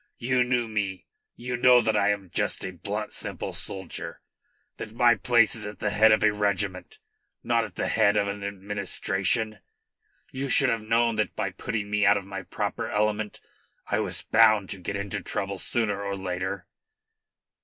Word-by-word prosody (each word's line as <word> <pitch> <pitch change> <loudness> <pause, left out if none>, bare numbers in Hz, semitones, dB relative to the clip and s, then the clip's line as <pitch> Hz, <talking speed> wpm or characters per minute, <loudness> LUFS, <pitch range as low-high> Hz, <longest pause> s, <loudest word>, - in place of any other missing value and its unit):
You 125 +1 +2
knew 125 -1 0
me. 100 -4 -3 0.3
You 125 +1 -4
know 125 0 +6
that 110 -2 +1
I 100 -1 +3
am 100 -4 -2
just - - -1
a 95 - -4
blunt, 100 +4 -5
simple - - -4
soldier 95 -3 -4 0.6
that 110 - -7
my 120 0 +5
place 115 +1 +3
is 115 - -1
at 105 0 -7
the 105 - -2
head 110 +2 +5
of 110 - +3
a 105 -1 +4
regiment, 100 -2 -2 0.5
not 115 -1 +1
at 105 - -12
the - - -2
head 100 +1 +3
of 100 -1 +1
an 100 0 -5
administration. 100 +2 -1 0.7
You 135 0 -4
should - - +5
have 115 - 0
known 115 +1 +1
that 110 - -1
by - - -2
putting 105 -2 -4
me 105 0 +1
out 100 0 +5
of 100 - -6
my 95 0 -6
proper 105 +1 -4
element 105 0 -1 0.5
I - - 0
was - - -2
bound 110 -3 +4
to 100 - -4
get 90 +3 -4
into 100 0 -4
trouble 100 +1 -4
sooner 110 -4 0
or 100 0 -3
later." 95 0 -4
105 Hz, 180 wpm, -26 LUFS, 100-110 Hz, 0.7 s, know